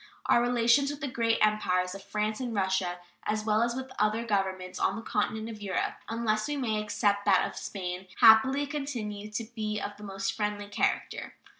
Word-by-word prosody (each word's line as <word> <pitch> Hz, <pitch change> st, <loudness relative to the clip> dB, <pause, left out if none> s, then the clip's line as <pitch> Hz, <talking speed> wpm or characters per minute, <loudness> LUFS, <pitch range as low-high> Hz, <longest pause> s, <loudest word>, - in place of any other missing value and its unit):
Our 235 Hz, -, +4 dB
relations 245 Hz, +3 st, +3 dB
with 290 Hz, 0 st, -5 dB
the 285 Hz, -, -3 dB
great 230 Hz, -3 st, +1 dB
Empires 185 Hz, -4 st, +1 dB
of 195 Hz, 0 st, -9 dB
France 210 Hz, +2 st, -2 dB
and 245 Hz, -3 st, -3 dB
Russia, 190 Hz, -2 st, 0 dB, 0.3 s
as 215 Hz, 0 st, -1 dB
well 215 Hz, 0 st, +3 dB
as 235 Hz, 0 st, +1 dB
with 260 Hz, 0 st, -5 dB
all 210 Hz, -, +5 dB
other 225 Hz, +2 st, -3 dB
governments 190 Hz, -3 st, -1 dB
on 190 Hz, -, +1 dB
the 225 Hz, -, -6 dB
continent 220 Hz, +1 st, -1 dB
of 220 Hz, -2 st, -8 dB
Europe, 195 Hz, -3 st, -1 dB, 0.2 s
unless 220 Hz, -2 st, 0 dB
we 295 Hz, 0 st, -2 dB
may 220 Hz, -5 st, 0 dB
except 205 Hz, -1 st, +1 dB
that -, -, +4 dB
of -, -, -9 dB
Spain, 185 Hz, -1 st, -5 dB
happily 260 Hz, +5 st, +7 dB
continue 240 Hz, -8 st, -4 dB
to 210 Hz, +2 st, -3 dB
be 215 Hz, -2 st, -2 dB
of 205 Hz, 0 st, -5 dB
the 210 Hz, -, -12 dB
most 195 Hz, -1 st, -3 dB
friendly 210 Hz, -1 st, -3 dB
character. 205 Hz, -, -1 dB
215 Hz, 195 wpm, -29 LUFS, 200-235 Hz, 0.3 s, happily